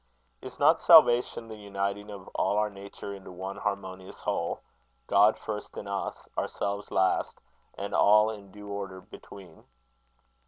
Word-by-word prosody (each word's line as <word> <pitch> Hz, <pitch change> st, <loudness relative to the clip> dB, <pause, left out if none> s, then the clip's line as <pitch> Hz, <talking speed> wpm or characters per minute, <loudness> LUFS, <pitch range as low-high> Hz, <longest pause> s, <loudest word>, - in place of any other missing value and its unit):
Is -, -, -9 dB
not -, -, +4 dB
salvation 120 Hz, -1 st, +6 dB
the 110 Hz, -, -8 dB
uniting 100 Hz, 0 st, -4 dB
of 100 Hz, -2 st, -9 dB
all 100 Hz, -, 0 dB
our 105 Hz, 0 st, +1 dB
nature 100 Hz, 0 st, -8 dB
into 95 Hz, -1 st, -10 dB
one 95 Hz, +2 st, -6 dB
harmonious 95 Hz, -2 st, -5 dB
whole -, -, -2 dB, 0.4 s
God 105 Hz, +2 st, +5 dB
first 105 Hz, -1 st, -6 dB
in 100 Hz, -, -6 dB
us, 100 Hz, 0 st, -4 dB
ourselves 100 Hz, 0 st, -3 dB
last, 95 Hz, 0 st, +1 dB, 0.4 s
and 100 Hz, 0 st, -5 dB
all 105 Hz, +1 st, +5 dB
in 100 Hz, -2 st, -10 dB
due 105 Hz, +1 st, -12 dB
order 100 Hz, -2 st, -5 dB
between? 95 Hz, -3 st, -14 dB
100 Hz, 145 wpm, -28 LUFS, 100-105 Hz, 0.4 s, salvation